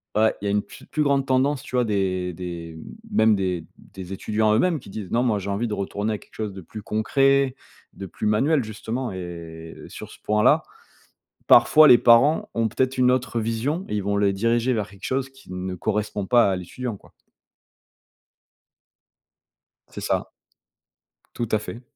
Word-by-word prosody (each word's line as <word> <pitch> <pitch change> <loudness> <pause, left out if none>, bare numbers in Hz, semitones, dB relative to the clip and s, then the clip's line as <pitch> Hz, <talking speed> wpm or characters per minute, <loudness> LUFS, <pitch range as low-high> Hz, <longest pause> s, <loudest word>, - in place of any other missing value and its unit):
ouais, 110 +1 +3
il - - -5
y - - 0
a - - +1
une 105 0 +2
pfe 100 - -14
plus 155 - 0
grande 140 -2 +2
tendance, 135 +1 +1
tu 130 - -7
vois? 125 - +3
Des 95 -4 -1
des 85 -2 -7 0.3
même 110 - +4
des 90 -4 -2
des 95 0 -10
étudiants 110 +2 +1
eux-mêmes 160 +8 +2
qui - - -14
disent: 100 -3 -7
«Non, 120 +1 +2
moi, 110 -5 +1
j'ai 100 +1 -6
envie 105 +4 -1
de 110 - -3
retourner 100 +2 -2
à - - -2
quelque - - -20
chose 105 -2 -4
de 95 - -9
plus 105 +5 -9
concret, 135 +5 +2 0.4
de 100 - -8
plus 95 - -6
manuel», 135 +7 +2
justement 115 +4 -4
et 85 -3 -8
sur - - -9
ce - - -15
point-là, 105 0 +3 0.9
parfois 150 +6 +7
les 120 - +9
parents 125 +7 +4
ont 115 -1 +1
peut-être 130 +4 -1
une 125 0 +4
autre 125 -2 -1
vision 115 - -2
et - - -2
ils 105 - -1
vont 100 +1 0
les 100 -1 +2
diriger 115 +5 +1
vers 105 -5 -2
quelque 100 0 -18
chose 135 0 -1
qui 135 -5 -16
ne 90 0 -4
correspond 105 +1 -2
pas 120 -2 +4
à - - 0
l'étudiant, 115 +6 -5
quoi. - - -21 2.8
C'est - - -8
ça. - - -1 1.1
Tout 120 - -2
à 110 - +4
fait. 110 +3 -8
110 Hz, 185 wpm, -23 LUFS, 100-125 Hz, 2.8 s, les